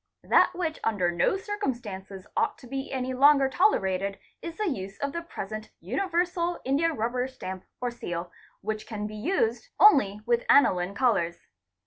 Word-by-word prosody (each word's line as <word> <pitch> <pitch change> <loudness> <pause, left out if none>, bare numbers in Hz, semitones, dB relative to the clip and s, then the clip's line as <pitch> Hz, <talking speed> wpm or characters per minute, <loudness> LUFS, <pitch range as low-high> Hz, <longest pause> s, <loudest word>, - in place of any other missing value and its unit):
That - - +4
which 330 -3 -2
under 185 -6 +1
no 175 - +2
circumstances 235 - -5
ought - - +1
to - - -14
be 270 +2 -5
any 260 -1 -2
longer 275 +1 +6
tolerated 195 - +1 0.2
is 335 -1 -7
the 425 - -1
use 195 - -4
of 280 0 -2
the 335 - -3
present 215 - -7
universal 345 - -1
india 290 +6 +2
rubber 245 0 -1
stamp 190 -8 -7
or 245 -1 -2
seal 175 -7 -5 0.3
which 215 +1 -4
can 210 -2 -4
be 215 0 -6
used 235 - 0
only 270 - +6
with 240 0 +2
aniline 190 -8 +4
colours. 200 -10 +1
240 Hz, 155 wpm, -27 LUFS, 200-315 Hz, 0.3 s, longer